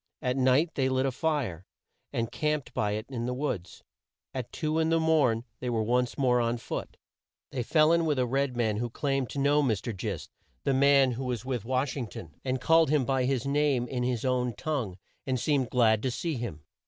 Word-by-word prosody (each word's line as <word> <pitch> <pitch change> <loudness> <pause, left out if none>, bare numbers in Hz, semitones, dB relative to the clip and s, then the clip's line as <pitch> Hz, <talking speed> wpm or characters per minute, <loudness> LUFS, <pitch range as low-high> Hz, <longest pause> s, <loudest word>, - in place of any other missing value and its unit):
At 125 -3 -1
night 135 +5 +3
they 130 -1 +1
lit 130 0 +1
a 135 - +1
fire, 130 - -1 0.5
and 115 0 -2
camped 150 +3 -1
by 105 -1 0
it 110 +1 -3
in 120 -3 -4
the 125 - -2
woods. 120 -10 -4 0.5
At 130 -3 -5
two 155 0 -1
in 160 0 +2
the 165 0 +3
morn, 150 -8 +3 0.2
they 125 - -3
were 115 -2 0
once 125 +2 0
more 125 -3 +3
on 115 +1 0
foot. 115 - -6 0.5
They 130 - -2
fell 155 +6 +4
in 170 -1 +3
with 150 -3 +1
a 125 - +2
red 135 0 0
man 110 -3 +1
who 120 +2 -2
claimed 135 +1 -1
to - - -7
know 145 +2 +4
Mr. 115 -4 -1
Gist, 95 -3 -5 0.3
the 140 - +1
man 140 -1 +5
who 125 +2 -4
was 125 -2 -3
with 125 -5 -3
Wash 130 +1 0
ing 130 -5 -3
ton, 80 -6 -10
and 130 0 -1
called 165 +3 +4
him 145 -3 +2
by 130 0 +1
his 130 -1 0
name 140 -3 +1
in 125 -1 -3
his 125 -1 -1
own 125 -2 0
tongue 125 -12 -3 0.3
and 130 -1 0
seemed 135 -2 +1
glad 110 -3 +3
to 130 - 0
see 160 +7 -2
him. 115 - -5
130 Hz, 215 wpm, -28 LUFS, 120-140 Hz, 0.5 s, man